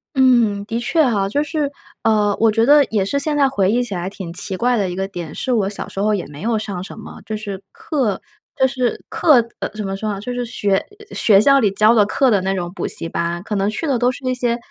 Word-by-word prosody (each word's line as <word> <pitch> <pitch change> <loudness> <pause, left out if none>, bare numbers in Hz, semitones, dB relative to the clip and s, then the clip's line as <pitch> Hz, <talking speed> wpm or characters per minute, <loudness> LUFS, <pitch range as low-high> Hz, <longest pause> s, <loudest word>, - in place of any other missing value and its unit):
嗯， 240 -6 +3
的 230 +2 -3
确 315 +6 +2
哈， 205 -5 +1
就 290 +6 0
是， 300 -2 -2 0.3
呃， 210 -2 +2
我 225 0 +4
觉 225 +1 +2
得 290 +2 +6
也 205 -4 -1
是 280 +8 -1
现 295 +1 0
在 275 -1 +4
回 200 -7 +1
忆 245 +2 +1
起 220 -5 -6
来 180 +1 -3
挺 190 -4 -8
奇 185 +2 0
怪 245 +4 +2
的 195 -3 0
一 175 - -5
个 190 +1 -2
点 175 -5 -7
是 260 - -2
我 200 -4 +1
小 205 - -5
时 195 - -7
候 215 +1 +2
也 190 - -4
没 145 +2 -11
有 225 +1 0
上 200 -4 -4
什 - - -10
么 - - -11
就 215 0 -4
是 200 -3 -6
课 305 - -2 0.3
就 265 -2 +3
是 255 -2 -2
课， 245 -7 +4
呃， - - -3
怎 215 -1 -4
么 195 - -3
说 210 +2 -3
呢？ 195 - -5
就 245 +5 -5
是 245 0 -2
学， 205 -4 0
呃， 420 - -9
学 200 -3 +6
校 275 +6 +5
里 215 -6 +3
教 215 +3 +4
的 215 -3 +5
课 260 +2 +2
的 200 -3 +3
那 190 +1 -1
种 175 -1 -4
补 - - -3
习 165 - 0
班。 170 +1 -3
可 210 - -4
能 195 +1 +1
去 220 +9 -3
的 265 -5 0
都 250 +1 +2
是 270 - -10
那 255 - +1
些 245 -2 -1
215 Hz, 290 characters per minute, -19 LUFS, 195-255 Hz, 0.3 s, 得